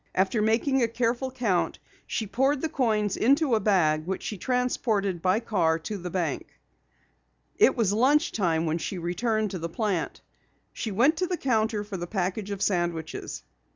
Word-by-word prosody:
After 195 +4 +2
making 235 +5 +2
a 235 - +3
careful 240 +3 -1
count, 235 -9 0 0.3
she 220 - -2
poured 270 +6 +1
the 320 - -1
coins 215 -8 +1
into 275 +2 +3
a 220 - +4
bag 165 -6 +2
which 190 - -3
she 215 - -4
transported 215 -5 0
by 185 +4 +2
car 180 -8 +1
to 165 +6 -5
the 180 0 -5
bank. 170 -5 -2 1.1
It - - +5
was 210 -4 +2
lunch 265 +7 +3
time 170 -5 0
when 160 +1 0
she 190 - -4
returned 210 +5 -1
to 185 - -4
the 170 +1 -4
plant. 195 -2 -2 0.5
She 225 - -4
went 250 +11 +3
to 365 - 0
the 360 0 -2
counter 220 -5 0
for 205 -2 -6
the 175 0 -5
package 195 +2 -2
of 200 -1 -3
sandwiches. 170 - -2
210 Hz, 175 wpm, -27 LUFS, 180-240 Hz, 1.1 s, It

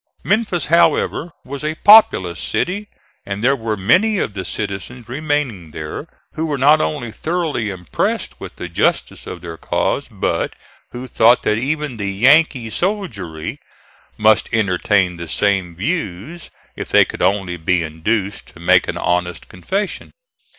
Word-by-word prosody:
Memphis, 205 -4 0
however, 170 0 +2
was 140 +2 -6
a 155 +1 -2
populous 175 - +6
city, 205 +4 -2 0.4
and 100 +2 -5
there 135 +3 +4
were 110 -4 -3
many 185 - +3
of 110 - -2
the 95 -2 -4
citizens 105 +5 -5
remaining 135 - -2
there 75 - -6 0.3
who 160 +1 -2
were 145 -2 -1
not 145 +4 +5
only 140 -7 -2
thoroughly 160 -7 -2
impressed 90 -4 -3
with - - -9
the 90 - -6
justice 85 - -1
of - - -7
their 85 -2 -8
cause, - - -1
but - - -2 0.3
who 125 +1 -7
thought 120 0 +4
that 105 - +1
even 145 0 -2
the 100 -1 -2
"Yankee 130 +2 +3
soldiery" 110 - -3 0.6
must 110 -1 +3
entertain 95 -4 +1
the 85 0 -7
same 95 -1 0
views 145 - -4 0.3
if - - -6
they - - +6
could - - -8
only 95 -1 +1
be 85 +1 0
induced 100 +6 -2
to - - -16
make 90 +1 +4
an - - -3
honest 90 -1 -1
confession. 190 - -3
110 Hz, 150 wpm, -19 LUFS, 90-155 Hz, 0.6 s, populous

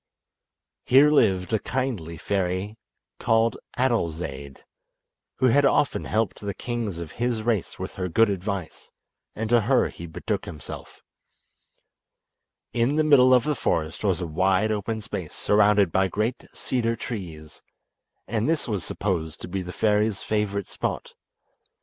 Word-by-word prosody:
Here 140 +4 +6
lived 95 -9 +2
a 110 - +3
kindly 110 -13 -3
fairy 95 +3 -2 0.4
called 115 0 +2 0.2
Adolzaide, 80 - -2 0.7
who - - +1
had 145 +5 +4
often 140 +1 +2
helped 110 -1 -1
the 100 -2 -4
kings 115 -7 -3
of 85 -2 -6
his 120 -2 -1
race 110 -5 -1
with - - -6
her 90 -1 -3
good 115 +7 +4
advice, 100 -3 -4 0.4
and 110 +1 -2
to 120 -1 +5
her 125 +5 +2
he 85 - -9
betook 80 - -3
himself. 75 - -9 1.7
In 120 +5 +1
the 155 - +3
middle 135 -4 +6
of 125 -2 +6
the 150 - 0
forest 80 - -1
was 95 -4 +1
a - - -1
wide 95 +6 +1
open 110 +1 -2
space - - -6
surrounded 105 -3 +3
by 95 +2 +2
great 110 +6 -2
cedar 115 -2 -1
trees, 85 -10 -7 0.7
and 110 +5 0
this 165 -2 0
was 105 -6 -2
supposed 80 -6 -3
to - - -6
be 95 +2 -3
the 90 0 -6
fairy's 105 0 +1
favourite 100 -2 -1
spot. - - -4
105 Hz, 145 wpm, -25 LUFS, 90-115 Hz, 1.7 s, Here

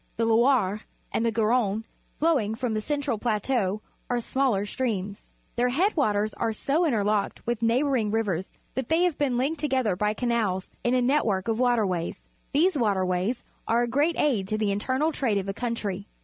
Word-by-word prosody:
The 230 - +1
Loire, 225 -3 +3 0.3
and - - 0
the 230 - +2
Garonne, 220 -1 +1 0.3
flowing 275 -10 +1
from 245 -1 -2
the 215 - -1
central 285 -3 -1
plateau, 215 -2 0 0.3
are 245 -1 +1
smaller 240 -4 0
streams. 205 -4 -3 0.3
Their 245 +1 +2
head 360 +12 +1
waters 215 -8 +1
are 225 -1 -1
so 290 +10 +1
interlocked 210 -5 0
with 235 -1 -2
neighbouring 240 -1 +2
rivers 200 -5 -1 0.2
that 265 -2 -3
they 325 +2 +3
have 355 -4 0
been 270 -4 +1
Unked 285 +5 0
together 260 - +1
by 210 +3 0
canals 220 -6 0 0.2
in 240 +1 +2
a 250 - +2
net 280 +4 +3
work 195 -2 -1
of 225 0 0
waterways. 215 -9 0 0.3
These 330 +5 +3
waterways 190 +1 0 0.2
are 235 +1 +3
a - - 0
great 290 +7 +1
aid 225 -10 +1
to 215 - -1
the 215 -2 +1
internal 260 +10 0
trade 240 -9 0
of 195 - -1
the 195 - -3
country. 205 -4 -3
230 Hz, 180 wpm, -26 LUFS, 205-260 Hz, 0.3 s, Loire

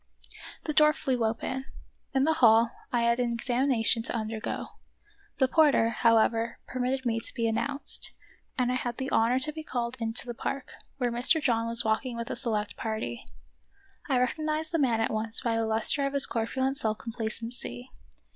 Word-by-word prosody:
The 305 - -3
door 300 0 +5
flew 260 -6 -1
open. 260 +4 -2 0.5
In 265 - +3
the 320 +2 +3
hall 230 0 +5 0.2
I 240 -1 +1
had 235 +1 +2
an 245 -1 0
ex 235 - -6
amination 240 -3 +2
to - - +1
undergo; 220 -1 -4 0.7
the 265 - +3
porter, 285 -5 +4
however, 230 0 +2
per 255 - -7
mitted 260 +1 -1
me 230 -1 0
to 230 - -2
be 230 -2 0
announced, 275 +6 -3 0.5
and 250 -1 +1
I - - 0
had 240 -1 -4
the 265 +1 -4
honor 235 +3 +3
to 300 +4 0
be 315 +1 -7
called 245 -3 -3
into 225 +2 -2
the 240 - -5
park, 265 +3 -5 0.3
where 245 -3 -1
Mr. 245 +7 +4
John 230 -5 0
was 230 0 +5
walking 235 +3 -1
with 235 0 -5
a - - -3
select 220 -4 -2
party. 215 - -5 0.8
I 260 - +2
recognized 310 +5 -1
the 330 - 0
man 240 -5 +2
at - - 0
once 220 +1 0
by 235 -3 0
the 225 0 0
lustre 220 +6 +5
of 275 - -5
his 280 -1 +8
corpulent 260 +4 -2
self 215 -3 -1
complacency. 230 +2 -6
240 Hz, 185 wpm, -28 LUFS, 225-265 Hz, 0.8 s, his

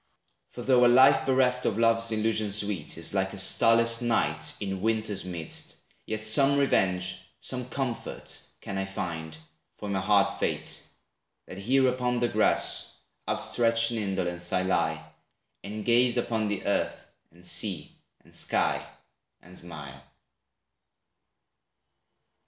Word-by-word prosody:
For 120 - -8
though 125 -1 +4
A - - +7
life 130 +4 +5
bereft 130 -1 +2
of 105 - -1
love's 115 0 +3
illusions 110 -2 0
sweet, 100 -9 -4
Is 80 +2 -3
like 95 -1 0
a - - -7
starless 115 +4 +4
night, 80 -10 0
in 95 -2 -4
winter's 110 -2 -1
midst, 85 -3 -3 0.3
Yet 110 0 -4
some 135 +6 +4
revenge, 95 -9 +1 0.2
some 125 -1 -5
comfort 130 -3 -4 0.2
can 95 -1 -4
I 95 - -1
find 80 -4 -5 0.4
For 105 - -8
my 100 -1 0
hard 100 +1 +2
fate, - - -1 0.6
that 95 - -9
here 130 +6 +3
upon 125 -1 0
the 120 0 +1
grass, - - +1 0.4
Outstretched 115 -1 +2
in 115 - -2
indolence 90 -4 -2
I 90 - +1
lie, 95 0 0 0.6
and 105 +1 -6
gaze 120 +1 +3
Upon 115 -2 -1
the 105 -2 -3
earth 100 - -1 0.2
and 90 +2 -13
sea 90 -2 +1 0.3
and - - -21
sky, - - +1 0.6
and 90 +2 -16
smile. 75 -6 -9
105 Hz, 135 wpm, -27 LUFS, 95-120 Hz, 0.6 s, A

